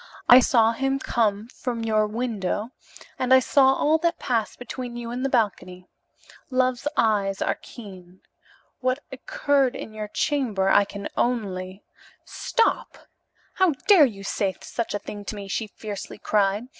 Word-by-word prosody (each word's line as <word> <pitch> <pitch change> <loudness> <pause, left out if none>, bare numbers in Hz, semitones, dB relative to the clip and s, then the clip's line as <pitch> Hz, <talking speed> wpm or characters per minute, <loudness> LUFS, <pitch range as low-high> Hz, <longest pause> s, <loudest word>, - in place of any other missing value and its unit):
I 245 - +10
saw 230 -3 +4
him 270 +3 -1
come 220 -5 0
from 240 -2 -4
your 215 -1 +2
window, 215 -1 -3 0.5
and 255 0 -1
I 260 - +9
saw 265 +1 +4
all 310 +3 +2
that 340 +1 0
passed 230 -5 -2
between 245 0 -7
you 235 -1 -6
in 245 +1 -4
the 270 - 0
balcony. 185 -7 -1 0.6
Love's 255 0 0
eyes 200 -3 +1
are - - -1
keen. 185 -5 -12 0.6
What 255 +2 -1
occurred 270 0 0
in 220 - -7
your 215 -1 -5
chamber 215 -6 0
I 200 +1 +5
can 200 0 -7
only 195 -5 -2 0.3
" - - -34 0.2
"Stop! 460 - +1 0.6
How 375 -4 +3
dare 375 -8 +8
you 200 -4 -9
say 195 -1 -1
such 235 -3 -4
a - - +1
thing 205 0 -8
to 215 - -5
me?" 200 -1 -7
she 215 +3 -2
fiercely 210 -1 -8
cried. 205 +3 0
230 Hz, 155 wpm, -24 LUFS, 200-255 Hz, 0.6 s, I